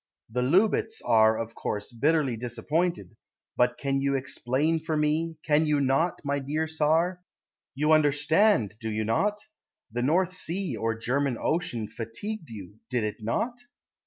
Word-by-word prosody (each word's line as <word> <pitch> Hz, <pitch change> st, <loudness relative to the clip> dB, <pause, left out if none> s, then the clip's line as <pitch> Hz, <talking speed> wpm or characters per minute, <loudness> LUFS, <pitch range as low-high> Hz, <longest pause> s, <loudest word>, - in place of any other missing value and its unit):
The 125 Hz, +2 st, 0 dB
Loubets 200 Hz, -, +2 dB
are, 110 Hz, 0 st, +5 dB
of 115 Hz, 0 st, -4 dB
course, 105 Hz, 0 st, -4 dB
Bitterly 140 Hz, +1 st, +1 dB
disappointed, 125 Hz, +6 st, -2 dB, 0.4 s
But 125 Hz, 0 st, +2 dB
you 135 Hz, 0 st, +1 dB
can -, -, +2 dB
explain 135 Hz, +4 st, 0 dB
for 160 Hz, 0 st, -2 dB
me, 155 Hz, +2 st, 0 dB
Can 155 Hz, +1 st, +3 dB
you 150 Hz, -1 st, +2 dB
not, 140 Hz, +6 st, +1 dB
my 140 Hz, 0 st, 0 dB
dear 150 Hz, +4 st, -1 dB
Tsar? 160 Hz, +3 st, +1 dB, 0.5 s
You 150 Hz, +3 st, +1 dB
understand, 155 Hz, -, +3 dB
Do 110 Hz, -2 st, -4 dB
you 110 Hz, 0 st, -1 dB
not? 205 Hz, -, +1 dB, 0.5 s
The 120 Hz, +2 st, -2 dB
North 175 Hz, +8 st, +2 dB
Sea 185 Hz, +1 st, -3 dB
or 115 Hz, 0 st, -1 dB
German 130 Hz, +2 st, 0 dB
Ocean 155 Hz, -9 st, -1 dB
Fatigued 155 Hz, -, -6 dB
you, 105 Hz, -1 st, -10 dB
Did 125 Hz, -3 st, 0 dB
it 105 Hz, 0 st, -3 dB
not? 225 Hz, -, -2 dB
145 Hz, 150 wpm, -27 LUFS, 115-165 Hz, 0.5 s, are